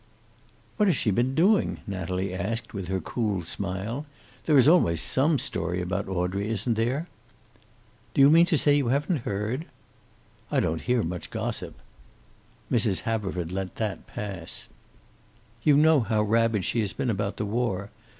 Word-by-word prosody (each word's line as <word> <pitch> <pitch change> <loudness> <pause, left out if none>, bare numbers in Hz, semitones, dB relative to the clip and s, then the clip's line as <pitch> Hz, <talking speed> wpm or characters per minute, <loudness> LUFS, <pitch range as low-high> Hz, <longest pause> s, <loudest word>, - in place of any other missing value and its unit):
"What 210 -2 +3
has 185 - +4
she 105 - +1
been 120 +6 +1
doing?" 195 +6 +3
Natalie 95 0 -3
asked, 110 +6 -3
with 95 -4 -5
her 95 +1 -1
cool 105 -4 -2
smile. 100 - -4 0.4
"There 150 -3 +5
is 130 - +6
always 120 - +4
some 145 - +2
story 90 -10 -2
about 95 +2 -2
Audrey, 95 +2 -1
isn't 115 +2 0
there?" 125 +9 -1 1.1
"Do - - +4
you 140 +2 +8
mean 170 +2 +6
to 160 - +3
say 145 0 +4
you 140 -4 +1
haven't 140 +2 0
heard?" 105 +9 -2 0.8
"I - - +1
don't 80 0 0
hear 125 -2 +1
much 90 +1 -5
gossip." - - -4 1.0
Mrs. 110 -5 +2
Haverford 95 -6 -2
let 95 0 -4
that 105 -3 -3
pass. 95 -5 -6 0.9
"You 145 +3 +5
know 155 0 +5
how 110 -2 +1
rabid 110 -2 +2
she 120 - 0
has 105 -3 -1
been 125 - -1
about 100 -1 -2
the 105 - -2
war. 105 -3 -2
110 Hz, 160 wpm, -26 LUFS, 95-135 Hz, 1.1 s, you